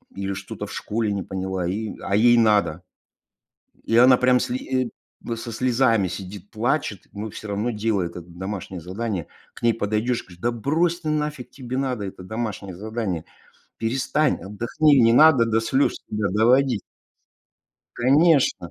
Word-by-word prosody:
или 100 Hz, 0 st, -3 dB
что-то 100 Hz, 0 st, -6 dB
в -, -, -9 dB
школе 110 Hz, 0 st, -2 dB
не 100 Hz, -2 st, -2 dB
поняла 95 Hz, -1 st, -3 dB
и 105 Hz, +4 st, -3 dB
а 100 Hz, -, -1 dB
ей 120 Hz, +2 st, +5 dB
надо. 105 Hz, -6 st, +2 dB, 1.0 s
И 115 Hz, -, -1 dB
она 125 Hz, +1 st, +7 dB
прям 125 Hz, 0 st, +4 dB
сли 130 Hz, 0 st, -2 dB, 0.4 s
э, 115 Hz, -, -1 dB
со 115 Hz, +1 st, -7 dB
слезами 115 Hz, -3 st, +2 dB
сидит, 95 Hz, +2 st, -8 dB
плачет, 115 Hz, -2 st, -1 dB
но 105 Hz, +2 st, -5 dB
всё 110 Hz, +1 st, -9 dB
равно 105 Hz, +4 st, -1 dB
делает 105 Hz, -5 st, -1 dB
это 90 Hz, -, -8 dB
домашнее 95 Hz, 0 st, -6 dB
задание. 95 Hz, 0 st, -4 dB, 0.3 s
К -, -, -14 dB
ней 115 Hz, -1 st, +4 dB
подойдешь, 110 Hz, +3 st, -1 dB
говорю: 90 Hz, -2 st, -15 dB
"Да 120 Hz, +1 st, +1 dB
брось 160 Hz, +9 st, 0 dB
ты, 155 Hz, -, -3 dB
нафиг 150 Hz, -4 st, -2 dB
тебе 130 Hz, -1 st, -6 dB
надо 130 Hz, -6 st, -2 dB
это 95 Hz, -1 st, -8 dB
домашнее 105 Hz, -2 st, -5 dB
задание? 105 Hz, -4 st, -3 dB, 0.6 s
Перестань, 135 Hz, +5 st, +1 dB
отдохни, 120 Hz, -, +2 dB
не 115 Hz, -1 st, +5 dB
надо 130 Hz, -2 st, +6 dB
до 115 Hz, 0 st, +2 dB
слез 135 Hz, +5 st, +1 dB
себя 105 Hz, -1 st, -1 dB
доводить". 120 Hz, +2 st, +3 dB, 1.2 s
Конечно! 140 Hz, -, +3 dB
115 Hz, 155 wpm, -23 LUFS, 100-125 Hz, 1.2 s, она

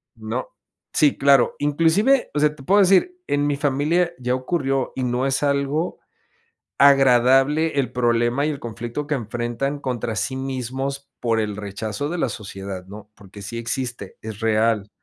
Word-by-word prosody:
No. 110 Hz, +3 st, -4 dB, 0.5 s
Sí, 150 Hz, -2 st, +3 dB
claro, 140 Hz, -3 st, +4 dB
inclusive, 165 Hz, -, +2 dB
o 150 Hz, -, 0 dB
sea, 150 Hz, 0 st, +2 dB
te 135 Hz, -, -13 dB
puedo 200 Hz, +8 st, +4 dB
decir, 195 Hz, -, +3 dB
en 145 Hz, 0 st, +1 dB
mi 145 Hz, -1 st, 0 dB
familia 150 Hz, +5 st, +1 dB
ya 125 Hz, 0 st, -1 dB
ocurrió 135 Hz, -1 st, -1 dB
y 130 Hz, -, -2 dB
no 125 Hz, +1 st, 0 dB
es 135 Hz, +2 st, 0 dB
algo 140 Hz, +3 st, 0 dB, 0.8 s
agradable 135 Hz, +3 st, +4 dB
el 130 Hz, -4 st, 0 dB
problema 120 Hz, +2 st, +1 dB
y 155 Hz, -, +1 dB
el 145 Hz, -2 st, -5 dB
conflicto 120 Hz, +5 st, -5 dB
que 150 Hz, -, -1 dB
enfrentan 120 Hz, +4 st, -3 dB
contra 120 Hz, -4 st, -3 dB
sí 130 Hz, +3 st, -2 dB
mismos, 135 Hz, +1 st, -4 dB
por 115 Hz, -2 st, +1 dB
el 105 Hz, -2 st, -3 dB
rechazo 105 Hz, +7 st, -4 dB
de 175 Hz, -, -3 dB
la 145 Hz, -, +1 dB
sociedad, 95 Hz, -4 st, -7 dB
¿no?, 105 Hz, +2 st, -11 dB
porque 100 Hz, 0 st, -14 dB
sí 105 Hz, +4 st, -6 dB
existe, 120 Hz, -3 st, -4 dB
es 110 Hz, -1 st, -8 dB
real. 110 Hz, -2 st, +1 dB
130 Hz, 165 wpm, -22 LUFS, 115-145 Hz, 0.8 s, claro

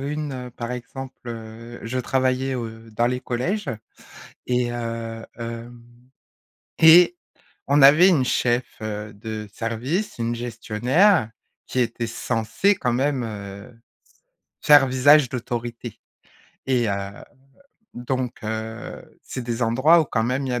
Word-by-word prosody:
une, 150 Hz, +1 st, -3 dB
heu, 125 Hz, -1 st, -6 dB
par 120 Hz, 0 st, -6 dB
exemple, 130 Hz, +2 st, -7 dB
heu, 115 Hz, +1 st, -9 dB
je 125 Hz, +3 st, -3 dB
travaillais 130 Hz, +1 st, 0 dB
au, 120 Hz, -2 st, -3 dB
heu, 115 Hz, 0 st, -12 dB
dans 120 Hz, +3 st, +1 dB
les 125 Hz, 0 st, -1 dB
collèges 160 Hz, -, -2 dB, 0.8 s
et, 125 Hz, -1 st, +1 dB
heu, 115 Hz, -1 st, -5 dB
hem, 115 Hz, +1 st, -7 dB, 1.0 s
et 170 Hz, +2 st, +7 dB, 0.5 s
on 145 Hz, +1 st, +4 dB
avait 150 Hz, +7 st, +8 dB
une 155 Hz, -8 st, +3 dB
chef, 120 Hz, 0 st, +1 dB, 0.2 s
heu, 105 Hz, -1 st, -5 dB
de 110 Hz, 0 st, -6 dB
service, 120 Hz, -, -3 dB
une 115 Hz, 0 st, -1 dB
gestionnaire, 120 Hz, -, +2 dB, 0.4 s
qui 130 Hz, -, -2 dB
était 120 Hz, -1 st, -1 dB
censée, 120 Hz, -, 0 dB
quand 125 Hz, -9 st, -1 dB
même, 135 Hz, +1 st, 0 dB
heu, 100 Hz, 0 st, -8 dB, 0.9 s
s -, -, -8 dB
faire 145 Hz, -2 st, +8 dB
visage 135 Hz, +3 st, +5 dB
d'autorité. 120 Hz, -2 st, -5 dB, 0.7 s
Et, 120 Hz, -4 st, +1 dB
heu, -, -, +1 dB, 1.0 s
donc, 125 Hz, 0 st, -3 dB
heu, 110 Hz, +1 st, -6 dB
c'est 125 Hz, -, -6 dB
des 120 Hz, 0 st, -3 dB
endroits 130 Hz, +9 st, +5 dB
où, -, -, +1 dB
quand 115 Hz, -4 st, 0 dB
même, 130 Hz, +3 st, -1 dB
il -, -, -3 dB
y -, -, -1 dB
a 120 Hz, -, -1 dB
120 Hz, 140 wpm, -23 LUFS, 115-135 Hz, 1.0 s, avait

